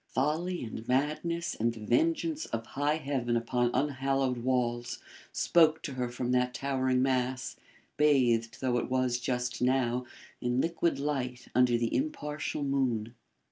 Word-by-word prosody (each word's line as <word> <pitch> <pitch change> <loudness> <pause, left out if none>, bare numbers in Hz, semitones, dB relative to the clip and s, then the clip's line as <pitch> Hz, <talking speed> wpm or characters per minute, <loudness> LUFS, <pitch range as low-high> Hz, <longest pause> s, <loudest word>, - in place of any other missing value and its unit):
Folly 160 +6 0
and 110 -1 -7
madness 155 +6 0
and 115 +1 +1
the 110 -2 -8
vengeance 325 - +1
of 115 0 -4
high 145 +5 0
heaven 135 -6 -1
upon 120 +1 +1
unhallowed 135 -1 0
walls, 120 -1 -1 0.3
spoke 160 -2 +3
to 140 - -4
her 125 -1 -2
from 120 +1 -3
that 125 0 +1
towering 130 -1 +1
mass, 130 -1 0 0.4
bathed 120 -6 +3
though 125 -2 +1
it - - -4
was 130 -1 +1
just 125 0 -2
now 125 -1 +1 0.3
in 125 +1 0
liquid 170 +2 +1
light 130 -4 -3
under 125 -1 +4
the 115 -1 -1
impartial 150 - -2
moon. 125 -5 0
130 Hz, 140 wpm, -30 LUFS, 120-145 Hz, 0.4 s, under